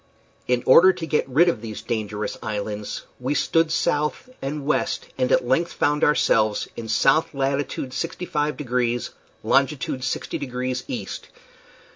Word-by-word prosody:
In 125 -1 +1
order 175 +8 +8
to 165 - -5
get 155 -4 0
rid 155 +7 +4
of 125 -11 +1
these 110 -2 -7
dangerous 105 -2 -3
islands 105 -1 -4 0.2
we 130 +4 -1
stood 165 +4 +2
south 150 - 0
and 140 +1 -4
west, 150 - 0
and 130 -1 0
at 125 - +3
length 165 +7 +1
found 150 0 +1
ourselves 110 -7 +3
in 115 - -6
south 135 +8 +2
latitude 135 -1 -2
65 150 -1 -2
degrees, 120 -3 -1 0.3
longitude 135 -1 +1
60 135 - -3
degrees 125 -1 -3
east. - - -6
135 Hz, 140 wpm, -23 LUFS, 120-150 Hz, 0.3 s, order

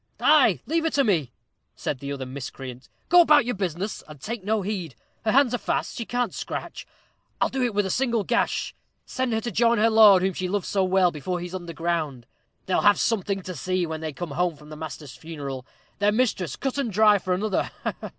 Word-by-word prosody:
"Ay, - - +5
leave 325 +1 0
her 325 - +2
to 280 -3 +2
me," 165 - +1 0.4
said 135 - -3
the 140 +1 -5
other 135 -2 -4
miscreant. 130 -1 -8 0.2
"Go 355 +1 +7
about 300 -6 +5
your 245 - -1
business, 190 +1 -3
and 150 -2 -12
take 220 - -5
no 210 0 0
heed. 185 - -4 0.3
Her 215 - +3
hands 265 -1 +4
are 245 - 0
fast - - -2
she 230 - -4
can't 245 -4 -1
scratch. - - -6 0.5
I'll - - +2
do 265 - -3
it 240 -4 0
with 205 -1 +2
a 190 - -2
single 235 -3 +1
gash - - 0 0.3
send 255 -2 -2
her 220 0 0
to 235 - -4
join 235 +1 +3
her 225 +2 +3
lord, 210 -4 +7
whom 190 0 +1
she 185 +1 -3
loved 200 +1 -1
so 195 -2 +1
well, 185 -1 +3
before 175 +4 -3
he's 175 +1 -7
under 175 -2 -5
ground. 160 -8 -2 0.4
They'll 185 - +1
have 205 0 +5
something 200 -3 0
to 185 - -6
see 180 +4 -1
when 160 -1 -5
they 160 -1 -3
come 170 +2 -6
home 175 +2 0
from 150 +1 -15
the 155 - -8
master's 150 -3 -8
funeral 140 -4 -7 0.3
their 205 +1 +3
mistress 215 -7 0
cut 270 +1 -3
and 250 -5 -1
dry 210 0 +5
for 185 -1 -1
another. 200 +1 -1
190 Hz, 220 wpm, -25 LUFS, 160-225 Hz, 0.5 s, Go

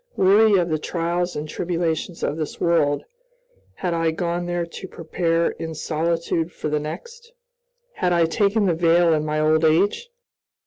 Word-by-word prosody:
Weary 205 +3 +5
of 175 -1 +1
the 155 -1 0
trials 175 +2 -2
and 150 +1 -4
tribulations 170 0 -2
of 145 - 0
this 155 -2 -5
world, 155 -4 +2 0.7
had 180 -2 -2
I 165 -1 +1
gone 175 +2 -2
there 175 -1 -1
to 170 +3 -9
prepare 165 0 -1
in 160 -1 -6
solitude 165 +1 -1
for 155 - -5
the 150 0 0
next? 470 - -8 0.7
Had 180 - +1
I 170 -1 +4
taken 205 +5 +1
the 180 - +2
veil 170 0 +3
in 155 -1 +1
my 155 0 -1
old 155 +1 +3
age? 195 - +2
170 Hz, 165 wpm, -22 LUFS, 160-180 Hz, 0.7 s, Weary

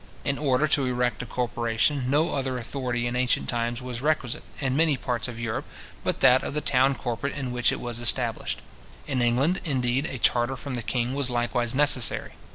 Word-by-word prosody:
In 140 -1 -1
order 145 0 +2
to 140 -2 +3
erect 125 -2 0
a 125 - -7
corporation, 120 +3 0
no 155 +5 +2
other 130 -2 -1
authority 120 0 -3
in 120 0 -2
ancient 125 0 +1
times 120 +1 -2
was 125 -1 -5
requisite, 150 -2 0 0.2
in 130 -2 0
many 155 -2 +3
parts 120 -2 -2
of 120 -2 -7
Europe, 115 -2 -3 0.4
but - - -1
that 125 +1 +6
of - - -5
the - - +1
town 135 -2 +3
corporate 120 +3 -3
in 135 -3 -3
which 120 -1 +2
it - - -3
was 120 -1 -4
established. 120 -1 0 0.4
In 130 -2 -1
England, 130 +10 +2
indeed, 130 -1 0
a 130 - -4
charter 120 +2 +2
from 130 +2 -6
the 120 - -2
king 120 +2 -1
was 140 -2 -1
likewise 120 0 0
necessary. 140 -4 +3
125 Hz, 195 wpm, -26 LUFS, 120-140 Hz, 0.4 s, that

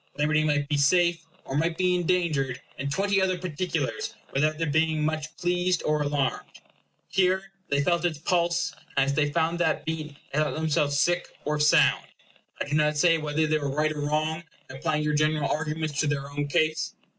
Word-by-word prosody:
Liberty 150 +1 +2
might 145 -2 +1
be 145 -1 0
safe, 170 +3 +3 0.2
or 135 - -5
might 165 +2 0
be 180 -1 +2
endangered, 170 -7 0 0.2
in 140 - -2
twenty 195 +6 +1
other 185 -1 +1
particulars, 170 -3 -3 0.2
without 155 +3 +1
their 165 - -1
being 160 0 +1
much 155 0 -3
pleased 180 0 0
or 150 0 +1
alarmed. 145 -2 -1 0.6
Here 190 +1 +1 0.2
they 140 0 +2
felt 170 +3 +1
its 170 -3 0
pulse; 170 0 0 0.2
and 135 - +4
as 140 - 0
they 145 0 +1
found 165 +2 0
that 170 -2 0
beat, 155 -2 -4 0.2
they 150 - +1
thought 155 - 0
themselves 150 -2 +1
sick 175 +4 +1 0.2
or 150 +1 0
sound. 150 0 +4 0.5
I - - -1
do 145 - -4
not 150 0 +2
say 165 +1 +4
whether 155 +1 0
they 155 0 +1
were 140 -1 -2
right 155 +1 +1
or 150 - -5
wrong 155 +2 -1 0.3
in - - -9
applying 150 +2 -1
your 150 0 0
general 155 -1 +2
arguments 155 -1 -2
to 155 - +2
their 140 -1 -2
own 145 0 -2
case. 155 +1 0
155 Hz, 190 wpm, -26 LUFS, 145-170 Hz, 0.6 s, and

